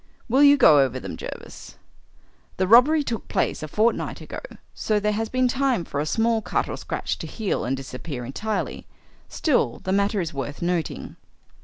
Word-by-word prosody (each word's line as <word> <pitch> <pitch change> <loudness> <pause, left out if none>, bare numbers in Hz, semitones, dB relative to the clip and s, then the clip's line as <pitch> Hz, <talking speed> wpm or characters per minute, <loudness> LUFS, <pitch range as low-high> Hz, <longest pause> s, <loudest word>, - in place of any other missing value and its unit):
Will 260 +4 +3
you 285 0 +7
go 155 - +7
over 130 -2 +1
them, - - -6
Jervis? - - -9 0.8
The 185 - +2
robbery 270 +8 +6
took 230 -6 -4
place - - -1
a 155 - -4
fortnight 220 +9 0
ago, - - -7 0.3
so 215 -1 0
there 210 +1 0
has 220 +1 -2
been 255 0 +2
time 255 -7 0
for 145 - -4
a 150 - -1
small 225 +4 +1
cut - - -1
or - - -4
scratch - - -4
to - - -6
heal 215 -4 -2
and 130 +3 -1
disappear 130 0 -6
entirely. 215 - -4 0.4
Still, 245 - +1
the 185 - -2
matter 200 +1 +1
is 170 -3 -3
worth 140 +1 -5
noting." 175 -2 -2
205 Hz, 180 wpm, -24 LUFS, 145-235 Hz, 0.8 s, you